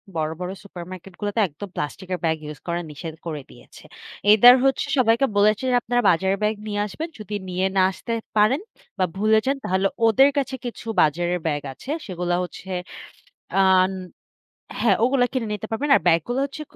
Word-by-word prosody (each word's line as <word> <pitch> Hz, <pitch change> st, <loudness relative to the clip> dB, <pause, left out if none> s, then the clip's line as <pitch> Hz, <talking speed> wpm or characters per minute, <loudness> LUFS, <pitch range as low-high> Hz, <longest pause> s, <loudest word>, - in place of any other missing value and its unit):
বড়, 155 Hz, -1 st, -1 dB
বড় 180 Hz, 0 st, -4 dB
super 185 Hz, -3 st, -9 dB
market 185 Hz, +1 st, -10 dB
গুলোতে 205 Hz, +1 st, -2 dB
একদম 180 Hz, +6 st, -9 dB
plastic 165 Hz, +5 st, -5 dB
এর 180 Hz, -, -2 dB
ব্যাগ 160 Hz, 0 st, +1 dB
use 150 Hz, -, -10 dB
করার 170 Hz, 0 st, -2 dB
নিষেধ 160 Hz, +2 st, -7 dB
করে 155 Hz, -3 st, -4 dB
দিয়েছে। -, -, -16 dB, 0.5 s
Either 240 Hz, +4 st, +9 dB
হচ্ছে 270 Hz, 0 st, +1 dB
সবাইকে 235 Hz, +1 st, +4 dB
বলেছে 210 Hz, +3 st, +3 dB
যে, -, -, +3 dB
আপনারা 245 Hz, +1 st, 0 dB
বাজারের 190 Hz, +3 st, +2 dB
ব্যাগ 210 Hz, +1 st, +1 dB
নিয়ে 205 Hz, -1 st, -2 dB
আসবেন। 315 Hz, -, -6 dB
যদি 210 Hz, 0 st, -6 dB
নিয়ে 185 Hz, +1 st, -1 dB
না 190 Hz, -, +5 dB
আসতে 210 Hz, +5 st, -5 dB, 0.2 s
পারেন 215 Hz, +7 st, +4 dB, 0.4 s
বা 185 Hz, -, +3 dB
ভুলে 215 Hz, +2 st, +4 dB
যান, 275 Hz, +1 st, +1 dB
তাহলে 190 Hz, +2 st, +1 dB, 0.2 s
ওদের 265 Hz, +6 st, +5 dB
কাছে 270 Hz, -1 st, -1 dB
কিছু 240 Hz, -1 st, -7 dB, 0.2 s
বাজারের 175 Hz, +4 st, +1 dB
ব্যাগ 145 Hz, -2 st, -1 dB
আছে। 255 Hz, -, -13 dB, 0.2 s
সেগুলা 175 Hz, -2 st, -2 dB
হচ্ছে, 180 Hz, +1 st, -9 dB, 0.9 s
আ -, -, +6 dB, 1.2 s
হ্যাঁ, 215 Hz, -5 st, +4 dB
ওগুলো 255 Hz, +1 st, +3 dB
কিনে 250 Hz, -4 st, -1 dB
নিতে 210 Hz, +1 st, -5 dB
পারবেন। 275 Hz, +7 st, -2 dB
আর -, -, +2 dB
ব্যাগগুলো 175 Hz, -, +2 dB
হচ্ছে 280 Hz, +2 st, -8 dB
200 Hz, 180 wpm, -23 LUFS, 175-235 Hz, 1.2 s, Either